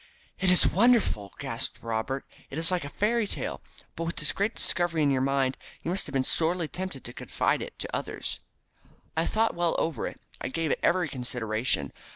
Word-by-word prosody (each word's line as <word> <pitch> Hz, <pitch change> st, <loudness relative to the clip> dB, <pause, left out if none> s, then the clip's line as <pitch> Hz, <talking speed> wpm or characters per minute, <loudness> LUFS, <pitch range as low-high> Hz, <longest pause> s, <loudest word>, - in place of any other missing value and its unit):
"It 190 Hz, -, +4 dB
is 180 Hz, -, +6 dB
wonderful!" 205 Hz, -, +4 dB
gasped -, -, -1 dB
Robert. 115 Hz, +4 st, -1 dB, 0.2 s
"It 135 Hz, -, -6 dB
is 165 Hz, +2 st, +2 dB
like 180 Hz, -3 st, +1 dB
a 145 Hz, -, -5 dB
fairy 215 Hz, +6 st, +1 dB
tale. -, -, -3 dB, 0.3 s
But 165 Hz, -, -2 dB
with 165 Hz, -, -2 dB
this 150 Hz, -2 st, 0 dB
great 205 Hz, +3 st, 0 dB
discovery 170 Hz, -3 st, 0 dB
in 140 Hz, -, +4 dB
your 130 Hz, -1 st, +2 dB
mind 135 Hz, -1 st, +2 dB, 0.3 s
you 170 Hz, -, -1 dB
must 190 Hz, -, 0 dB
have 145 Hz, -, -8 dB
been 135 Hz, -1 st, +3 dB
sorely 165 Hz, +3 st, +2 dB
tempted 185 Hz, -5 st, -5 dB
to 120 Hz, -, -8 dB
confide -, -, 0 dB
it -, -, -7 dB
to -, -, -4 dB
others." -, -, -3 dB, 0.8 s
"I 160 Hz, +1 st, +2 dB
thought 225 Hz, +1 st, +2 dB
well 170 Hz, -1 st, +1 dB
over 160 Hz, -8 st, 0 dB
it. -, -, -8 dB, 0.2 s
I -, -, -1 dB
gave 160 Hz, +3 st, -1 dB
it -, -, +1 dB
every 180 Hz, -2 st, +3 dB
consideration. 120 Hz, -, 0 dB
160 Hz, 200 wpm, -28 LUFS, 130-180 Hz, 0.8 s, is